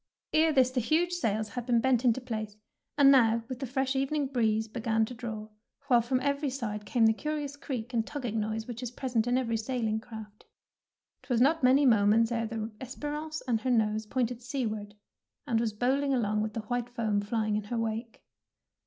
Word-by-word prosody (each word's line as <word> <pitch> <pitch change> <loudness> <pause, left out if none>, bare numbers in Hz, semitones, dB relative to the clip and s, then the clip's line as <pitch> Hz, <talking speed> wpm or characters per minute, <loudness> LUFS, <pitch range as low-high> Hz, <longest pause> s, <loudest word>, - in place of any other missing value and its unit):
Ere 315 +1 +4
this 260 -3 +4
the 255 - 0
huge 325 +8 +1
sails 220 -10 -1
had 245 +1 -6
been 240 -2 +4
bent 250 0 +2
into 245 0 +3
place, 215 -4 -5 0.4
and 275 -1 +7
now 230 -4 +4
with 255 -1 -6
the 270 - -3
fresh 265 +1 -1
evening 275 +2 0
breeze 220 -4 +1
began 225 -1 0
to 250 - -8
draw, 225 -3 -6 0.4
while 240 -2 +6
from 250 +2 0
every 280 +1 0
side 215 -6 -4
came 235 -3 +3
the 220 - +5
curious 295 +2 -3
creak 250 -4 -5
and 225 -1 0
tugging 245 -7 -3
noise 220 +1 -2
which 240 0 -7
is 250 - -3
pres 250 +1 -6
ent 225 +1 +3
in 245 +1 +2
every 230 -3 0
sailing 220 -1 -1
craft. 220 -2 -11 0.8
^Twas 245 -3 0
not 310 +6 +4
many 265 +3 +5
moments 225 0 +4
ere 230 -1 0
the 225 0 -4
"Esperance^' 295 +4 -5
had 230 -4 0
her 255 - -1
nose 215 -2 +1
pointed 245 -1 -1
seaward, 220 -6 -4 0.5
and 235 -5 +1
was 230 -1 0
bowling 265 +5 +1
along 215 -3 +1
with 215 0 -2
the 225 - -3
white 245 +2 -3
foam 220 -4 0
fiying 215 0 -1
in 210 -1 -2
her 235 +3 -3
wake. 225 0 -3
235 Hz, 200 wpm, -29 LUFS, 220-260 Hz, 0.8 s, and